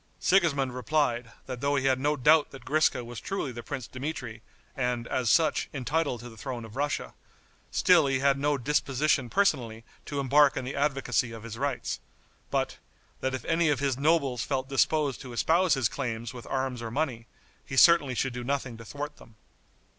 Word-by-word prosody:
Sigismond 145 -9 +2
replied, 125 -3 0
that 125 -2 -6
though 140 +1 +1
he 135 -1 0
had 130 -1 +3
no 145 +3 +1
doubt 150 +3 +4
that 135 - -12
Griska 150 -5 +2
was 120 -1 -7
truly 195 -9 -3
the 120 -1 -7
Prince 135 -1 -5
Dmitri, 125 -4 -6 0.3
and, 125 -2 -1
as 125 -3 0
such, 160 +3 +3
entitled 140 -2 -1
to 120 - -9
the 110 - -14
throne 120 -1 -5
of 110 - -12
Russia, 145 +2 -2 0.6
still 170 -6 +4
he 135 0 +1
had 140 +1 +2
no 145 0 +1
disposition 140 0 +1
personally 125 - +1 0.2
to 145 - -3
embark 140 +1 +4
in 130 - -3
the 130 - -5
advocacy 135 -5 0
of 115 -1 -9
his 115 -1 -7
rights; 135 +1 -2 0.5
but, - - -1 0.4
that 130 0 -1
if 130 - -7
any 165 -1 +2
of 145 -3 +1
his 140 -2 0
nobles 140 -3 +1
felt 130 -2 -2
disposed 140 0 +1
to 125 -2 -8
espouse 165 +6 +3
his 130 -4 +2
claims 115 -2 -4
with 120 -2 -10
arms 130 -2 -2
or 115 - -4
money, 120 -3 -2 0.4
he 135 - -6
certainly 145 -5 +6
should 130 +1 -1
do 125 0 -5
nothing 130 -2 -2
to 115 - -10
thwart 145 +4 -6
them. 115 - -17
135 Hz, 190 wpm, -28 LUFS, 120-145 Hz, 0.6 s, certainly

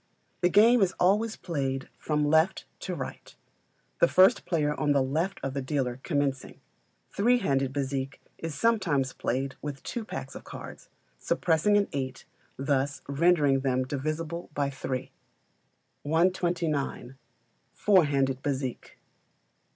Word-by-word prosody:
The 180 - +3
game 225 +5 +6
is 190 -2 +2
always 210 +5 +2
played 135 -6 -3
from 150 -1 0
left 160 +4 +2
to - - -4
right, - - -7 0.6
the - - +6
first 190 - +5
player 150 -4 +1
on 150 -1 +1
the 140 - +3
left 160 +9 -1
of 135 - -2
the 140 - -2
dealer 130 -2 -2
commencing. 140 -4 -2 0.5
Three 240 +5 +3
handed 135 - 0
bézique 135 0 -2 0.2
is 165 -3 -5
sometimes 165 - +1
played 135 +2 -2
with 145 -2 -6
two 235 - -4
packs 220 - -6
of - - -9
cards, - - -10 0.3
suppressing 175 +5 +2
an 205 - +2
eight, 135 -2 -4 0.3
thus 140 0 -1
rendering 145 -1 +3
them 130 -1 0
divisible 155 +5 -4
by 140 -1 0
three. 130 -1 -4 0.9
129. 160 -5 0 0.5
Four 190 -5 +4
Handed 135 -2 0
Bezique. 135 -3 -4
145 Hz, 130 wpm, -28 LUFS, 135-175 Hz, 0.9 s, game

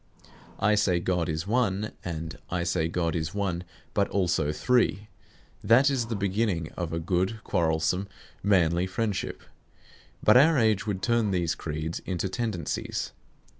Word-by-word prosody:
"I 105 - +3
say 95 -4 +2
God 85 -2 0
is 80 +2 -2
One," 105 -2 0
and 80 -4 -5
"I 90 -1 -1
say 85 -2 0
God 85 0 -1
is 80 +2 -3
One 90 -4 -1 0.3
but 100 -1 +2
also 85 -6 +1
Three," 105 +2 +1 0.5
that 130 +5 +5
is 125 -4 0
the 115 - -2
beginning 100 -4 -1
of 85 -3 -4
a 80 - -2
good 95 +6 -1
quarrelsome, 85 +2 0 0.3
manly 90 -3 +3
friendship. 100 +2 -2 0.8
But 110 - +7
our 155 +4 +6
age 110 -4 +2
would 95 -3 -2
turn 115 -3 +2
these 85 -3 +1
creeds 80 0 -4
into 95 0 -3
tendencies. 100 -7 -3
95 Hz, 145 wpm, -27 LUFS, 85-105 Hz, 0.8 s, But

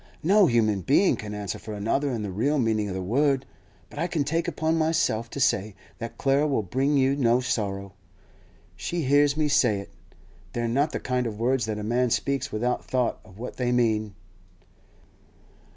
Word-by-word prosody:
'No 195 +3 +5
human 110 -6 +2
being 145 - +3
can 105 -1 -7
answer 100 -3 -4
for 105 0 -7
another 115 +8 0
in 115 -5 -3
the 100 - -4
real 135 +11 0
meaning 110 -4 +1
of 95 - -4
the 95 - -3
word; 135 +6 +1 0.4
but - - -10
I 170 - 0
take 165 0 -1
upon 160 0 0
myself 155 -8 +1
to 140 - -6
say 105 -5 +1 0.2
that 115 0 -6
Clara 140 +2 +2
will 135 -7 0
bring 135 +9 +1
you 135 0 +3
no 120 -3 +3
sorrow. 100 -6 -3 0.8
She 170 -2 -3
hears 145 +1 +3
me 155 -1 +2
say 120 -7 +3
it. 100 - -10 0.6
They're 120 -1 -1
not 140 +6 +1
the - - -3
kind 125 -1 -1
of 105 -2 -6
words 125 0 +1
that 110 -1 -3
a 105 - -5
man 120 +3 +1
speaks 140 +4 -1
without 120 +3 -1
thought 125 -2 -1
of 100 -3 -17
what 120 +3 -7
they 125 -1 0
mean. 110 -4 +1
125 Hz, 185 wpm, -26 LUFS, 110-140 Hz, 0.8 s, No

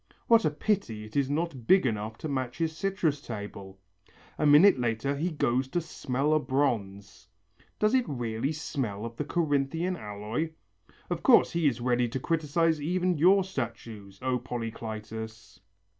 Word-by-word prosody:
What 230 -1 +5
a - - +4
pity 150 - -1
it 110 0 -12
is 140 -2 +1
not 145 -5 -2
big 190 -5 +5
enough 110 -1 -2
to - - -5
match 130 -4 -3
his 160 -1 -1
citrus 170 -6 -1
table! 100 -4 -8 0.6
A 150 - +3
minute 150 +2 +7
later 120 +4 -1
he 160 +6 -1
goes 130 -5 0
to 175 - -1
smell 145 -2 -1
a 155 - +4
bronze: 115 -8 -2 0.5
Does 215 +2 +2
it 255 -2 +2
really 120 0 -2
smell 125 -9 -3
of 115 0 -7
the - - -1
Corinthian 160 +3 0
alloy? 110 +7 -4 0.6
Of - - -1
course - - +6
he 170 -2 +1
is 120 -4 0
ready 120 0 +2
to 130 - -3
criticize 160 +1 +1
even 180 +1 0
your 190 +4 +6
statues, 115 - -6
O 130 -1 +1
Polycletus! 110 -2 -6
135 Hz, 160 wpm, -28 LUFS, 115-160 Hz, 0.6 s, minute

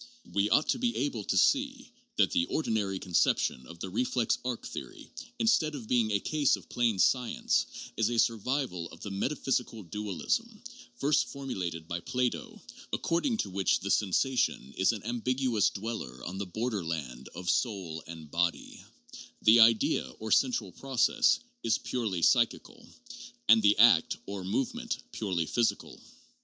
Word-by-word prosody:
We 100 +1 +2
ought 150 - +3
to - - +1
be 240 -1 0
able 120 -7 -2
to - - 0
see 270 -2 +2 0.2
that - - +3
the 260 -1 +2
ordinary 110 -10 -1
conception 80 -8 +1
of 85 - -11
the 95 - -5
reflex 120 +2 0
arc 125 -2 -4
theory, 345 -5 -8 0.3
instead 220 -10 +2
of 120 -6 -8
being 115 -3 +2
a 100 -1 +1
case 150 +4 +2
of - - -14
plain 120 -4 +1
science, 125 +6 +2 0.3
is 115 0 +2
a 120 - -2
survival 115 - 0
of 85 - -14
the 100 - -6
metaphysical 125 0 -2
dualism, 105 - -3 0.3
first 150 -9 +2
formulated 90 -12 -5
by 85 +1 -3
Plato, 125 +6 -2 0.3
according 220 +9 0
to 95 - -9
which 95 0 +1
the 100 - -2
sensation 105 - +1
is 95 - +3
an 110 -4 -6
ambiguous 120 -2 +1
dweller 95 - -6
on 95 +3 -5
the 100 - -3
border 110 +1 -2
land 75 -7 -5
of 90 +1 -7
soul 90 -9 -1
and 80 -2 -10
body, 85 0 -2 0.6
the 110 +2 +7
idea 115 -1 +4
(or 110 0 -6
central 120 -7 +2
process) 135 - +2 0.2
is 110 - +1
purely 105 -9 -3
psychical, - - +1 0.6
and 110 +1 +7
the 105 0 +4
act 105 -7 +5
(or 100 -1 -6
movement) 110 +8 -2
purely 90 -6 -2
physical. 115 +6 -1
110 Hz, 150 wpm, -29 LUFS, 95-130 Hz, 0.6 s, the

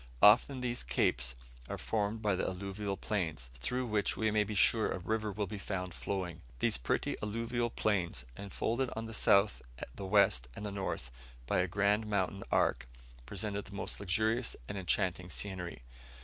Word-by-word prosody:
Often 125 +5 +7
these 120 -1 -1
capes 65 +1 +1 0.3
are - - -3
formed 110 0 -1
by 105 -2 +3
the 95 - 0
alluvial 100 +1 -3
plains, 80 -11 -2
through 125 - -2
which 105 -3 +1
we 110 -1 +2
may 105 0 +4
be 105 +1 -4
sure 110 +2 +4
a - - -1
river 110 +3 -1
will 105 +1 -1
be 100 +1 -6
found 90 -3 -3
flowing. 90 -3 -3 0.2
These 60 - +2
pretty - - 0
alluvial 115 +3 -1
plains, 90 - 0
enfolded 115 - -1
on 110 +1 -3
the 115 - -7
south, 100 -1 +4 0.3
the 95 +8 -6
west, 95 - +4
and 105 - -5
the 105 - -3
north 95 -10 -3 0.3
by - - +2
a 90 - +2
grand 100 +3 +2
mountain 100 -1 0
arc, - - +2 0.4
present 100 +3 -3
most 100 - -4
luxurious 110 +5 +1
and - - -4
enchanting 90 -1 0
scenery. 90 -9 -4
100 Hz, 165 wpm, -33 LUFS, 90-110 Hz, 0.4 s, Often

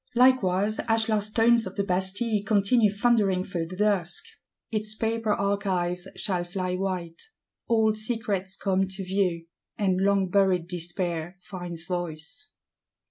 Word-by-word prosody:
Likewise 215 -5 +3
ashlar 225 -1 +2
stones 225 +2 +3
of - - -8
the 200 - 0
Bastille 195 +4 0
continue 210 +1 +3
thundering 205 -3 +2
through 170 -4 -3
the 185 - -8
dusk; 200 -4 0 0.5
its 215 -1 -1
paper 225 0 -1
archives 190 -3 -1
shall 180 -4 -1
fly 185 0 -3
white. 180 -3 -3 0.5
Old 220 -2 +3
secrets 215 -4 -2
come 195 -1 0
to 190 +1 -6
view; 180 -3 0 0.3
and 190 -3 +1
long 195 -1 +2
buried 190 -3 +3
Despair 175 0 -3
finds 175 -3 -7
voice. 175 - -5
195 Hz, 130 wpm, -26 LUFS, 180-215 Hz, 0.5 s, Likewise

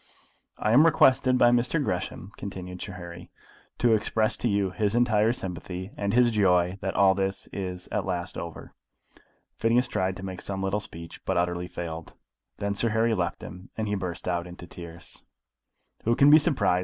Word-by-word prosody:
"I 105 - 0
am 135 +7 +7
requested 130 -4 +4
by 120 -1 +5
Mr. 120 +5 +2
Gresham," 90 - -3
continued 90 -2 -7
Sir 100 - -6
Harry, 85 -1 -9 0.5
"to 120 -2 +3
express 110 +1 +2
to 120 - 0
you 100 -2 +1
his 100 +3 0
entire 115 -2 +3
sympathy, 95 -2 -6
and 100 0 -1
his 120 +1 +4
joy 90 -3 +2
that 95 -1 -3
all 95 0 +5
this 95 0 -2
is 90 -2 -5
at - - 0
last 90 -1 -3
over." 85 -1 -7 0.9
Phineas 120 +2 +3
tried 95 -4 -1
to 95 - -7
make 95 -1 -6
some 95 -1 -4
little 95 +2 0
speech, 85 -5 -10
but 95 - -1
utterly 90 0 0
failed. 85 -2 -7 0.4
Then 100 0 -1
Sir 115 +3 +1
Harry 110 +1 +2
left 90 -5 -2
them, 90 +2 -10
and 110 -1 -1
he 105 - -1
burst 90 -3 -4
out 85 -1 -1
into 90 0 -10
tears. 85 -1 -11 0.8
"Who 115 +1 +2
can 140 +3 +6
be 155 - +9
surprised?" 115 - +2
95 Hz, 180 wpm, -27 LUFS, 90-110 Hz, 0.9 s, be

